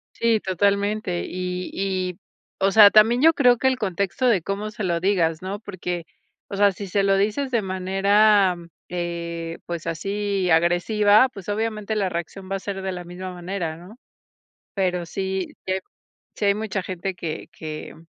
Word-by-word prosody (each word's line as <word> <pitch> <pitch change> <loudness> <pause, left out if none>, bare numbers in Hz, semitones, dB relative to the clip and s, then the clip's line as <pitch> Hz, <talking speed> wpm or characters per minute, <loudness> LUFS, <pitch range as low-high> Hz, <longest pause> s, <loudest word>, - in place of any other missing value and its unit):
Sí, 230 -1 +2
totalmente, 200 -1 0
y 180 0 -4
y, 185 -2 -2 0.4
o 195 0 +3
sea, 205 0 +9
también 225 +4 +5
yo 325 +2 +7
creo 250 -5 +4
que 265 - +1
el 260 -1 +2
contexto 200 +3 -1
de 215 -7 +3
cómo 200 +5 -3
se 215 - -6
lo 170 -2 0
digas, 170 -4 +1
¿no?, 190 +2 -4
porque, 180 -5 -5 0.4
o 200 - -5
sea, 205 0 +5
si 195 +1 -7
se 200 +2 +1
lo 195 0 +3
dices 215 +8 0
de 235 -3 +2
manera, 195 +1 +3 0.3
eh, 170 -1 -4
pues, 170 -1 -5
así 195 +2 -1
agresiva, 205 +8 +4
pues, 195 -7 -11
obviamente 215 0 -2
la 200 -3 0
reacción 180 +3 -6
va - - +1
a - - -8
ser 195 0 -5
de 190 0 -3
la 180 -1 -6
misma 180 +1 -7
manera, 175 -2 -4
¿no?, 180 +7 -13 0.8
pero 180 -3 0
sí 190 +1 -3 0.2
sí 185 - 0 0.6
sí 210 - -2
hay - - +5
hay - - -1
mucha 210 -2 -3
gente 185 0 -4
que 165 -3 -5
que 155 -1 -7
195 Hz, 175 wpm, -23 LUFS, 180-205 Hz, 0.8 s, sea